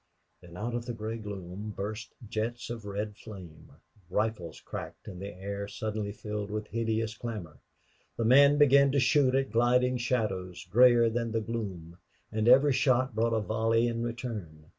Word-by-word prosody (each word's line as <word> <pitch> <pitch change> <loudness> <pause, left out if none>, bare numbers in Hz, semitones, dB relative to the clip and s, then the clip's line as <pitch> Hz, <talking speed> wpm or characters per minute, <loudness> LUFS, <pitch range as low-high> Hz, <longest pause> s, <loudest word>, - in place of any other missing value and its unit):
Then 85 0 -12
out 115 +4 -3
of 120 0 -3
the 120 - -3
gray 110 +1 -4
gloom 100 0 -7
burst 105 +3 -5
jets 115 +3 -3
of 115 -3 -6
red 105 +1 -4
flame; 95 -8 -11 0.4
rifles 100 -5 -2
cracked, - - -8
and 95 -3 -8
the 100 - -4
air 100 +2 -5
suddenly 105 -1 -3
filled 105 0 -5
with 105 0 -3
hideous 115 -1 -1
clamor. 105 - -6 0.6
The 115 - 0
men 140 +4 +7
began 140 -1 +6
to 140 - +3
shoot 130 +1 +3
at 135 0 0
gliding 125 +2 +3
shadows, 105 -7 -2
grayer 120 +1 +6
than 115 0 -2
the 115 - +2
gloom. 95 -7 -5 0.3
And 110 +1 0
every 135 +3 +7
shot 130 -1 +2
brought 115 +1 +1
a 110 - +1
volley 115 +2 +1
in 115 -1 -2
return. 115 -10 -5
110 Hz, 165 wpm, -29 LUFS, 100-120 Hz, 0.6 s, men